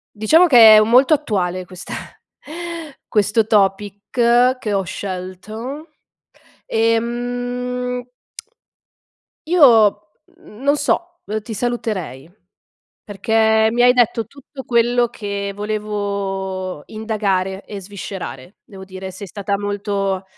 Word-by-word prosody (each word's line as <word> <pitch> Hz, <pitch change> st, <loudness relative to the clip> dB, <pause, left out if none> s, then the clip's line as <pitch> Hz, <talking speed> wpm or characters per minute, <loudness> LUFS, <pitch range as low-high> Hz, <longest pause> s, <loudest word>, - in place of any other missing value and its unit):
diciamo 315 Hz, +13 st, +4 dB
che 230 Hz, -7 st, +9 dB
è -, -, +8 dB
u 215 Hz, -, +4 dB
molto 255 Hz, +7 st, +5 dB
attuale 185 Hz, -11 st, -1 dB
questa 180 Hz, 0 st, -9 dB, 1.1 s
questo 210 Hz, +1 st, +2 dB
topic 205 Hz, -1 st, +1 dB, 0.6 s
che 215 Hz, -4 st, -3 dB
ho 195 Hz, -1 st, +1 dB
scelto. 205 Hz, -, -7 dB, 0.8 s
Ehm 245 Hz, +2 st, -2 dB, 1.4 s
Io, 225 Hz, -, +5 dB, 0.3 s
mhmm, 210 Hz, +3 st, -15 dB
non 285 Hz, +1 st, +3 dB
so, 345 Hz, +4 st, -1 dB
ehm, 215 Hz, +1 st, -3 dB
ti 220 Hz, +2 st, -7 dB
saluterei 205 Hz, -, -3 dB, 0.7 s
perché 220 Hz, +1 st, +2 dB
mi 240 Hz, +1 st, +2 dB
hai 245 Hz, 0 st, +7 dB
detto 235 Hz, -3 st, +1 dB
tutto 275 Hz, +1 st, -12 dB
quello 240 Hz, 0 st, +2 dB
che 200 Hz, -3 st, -5 dB
volevo 200 Hz, -4 st, -3 dB
indagare 200 Hz, -3 st, -2 dB
e 205 Hz, -2 st, -8 dB
sviscerare. 190 Hz, -, -8 dB
Devo 190 Hz, -2 st, -12 dB
dire 190 Hz, 0 st, -8 dB
sei 190 Hz, +2 st, -9 dB
stata 200 Hz, +1 st, -3 dB
molto 200 Hz, -1 st, -2 dB
210 Hz, 105 wpm, -19 LUFS, 195-240 Hz, 1.4 s, che